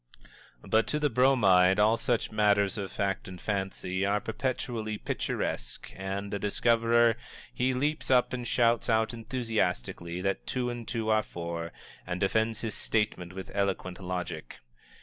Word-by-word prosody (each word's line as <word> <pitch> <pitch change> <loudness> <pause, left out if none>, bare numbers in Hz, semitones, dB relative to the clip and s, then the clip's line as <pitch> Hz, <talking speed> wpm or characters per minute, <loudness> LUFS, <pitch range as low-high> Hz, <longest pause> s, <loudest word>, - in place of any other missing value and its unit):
But 110 0 +3
to 150 - 0
the 150 -2 +1
Bromide 105 -8 +5
all 105 +2 +5
such 120 0 -1
matters 105 -2 +3
of 100 -2 -4
fact 100 -1 -2
and 90 -1 -8
fancy 95 -2 -2
are 100 +1 +2
perpetually 110 -1 -3
picturesque, - - -3
and, 95 +1 -4
a 100 - -1
discoverer, 115 +2 +3 0.4
he 130 +1 +1
leaps 150 +4 -1
up 125 -1 +4
and 125 -1 -3
shouts 120 -1 +2
out 110 0 +2
enthusiastically 110 - -2
that 95 0 -2
two 125 -1 -1
and 120 -1 -7
two 115 -2 -2
are 110 0 +4
four, 85 -3 -5 0.4
and 90 0 -2
defends 110 +3 +1
his 110 -3 -3
statement 95 -5 -1
with 95 0 -7
eloquent 95 -2 -1
logic. 90 -8 -5
105 Hz, 150 wpm, -29 LUFS, 95-115 Hz, 0.4 s, Bromide